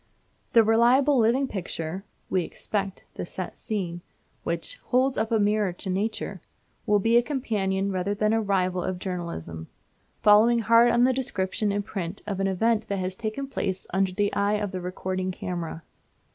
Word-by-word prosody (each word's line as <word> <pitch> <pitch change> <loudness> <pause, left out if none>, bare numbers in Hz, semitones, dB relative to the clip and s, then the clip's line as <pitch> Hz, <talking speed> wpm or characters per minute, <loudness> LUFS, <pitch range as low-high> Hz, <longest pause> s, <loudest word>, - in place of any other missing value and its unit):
The 230 - +7
reliable 245 +5 +4
living 240 +5 +3
picture 180 -3 -4 0.2
(we 185 - +1
expect 195 +2 -4
the - - -5
"set - - -6
scene") 180 -6 -4 0.4
which - - -2
"holds 260 +1 +2
up 220 +1 -1
a 225 - +4
mirror 210 -2 +2
to 190 +2 -4
nature," 205 +4 -2 0.5
will 210 - +5
be 225 +4 +3
a - - +6
companion 200 -8 -1
rather 190 +2 -1
than 215 +1 +1
a 225 - +2
rival 185 -3 +1
of 185 -1 -2
journalism, 170 - -5 0.6
following 215 +3 +6
hard 230 +1 +5
on 240 0 +4
the 260 +1 +4
description 210 -4 -1
in 205 0 -1
print 195 -2 -5
of 200 -2 -3
an 195 - +1
event 220 +3 +1
that 200 - -1
has 185 0 -2
taken 220 +7 -3
place 195 -8 -3
under 190 0 +2
the 205 +2 0
eye 200 +1 +1
of 205 -2 -2
the 185 -2 -4
recording 185 +1 -3
camera. 170 -3 -5
205 Hz, 170 wpm, -26 LUFS, 185-225 Hz, 0.6 s, The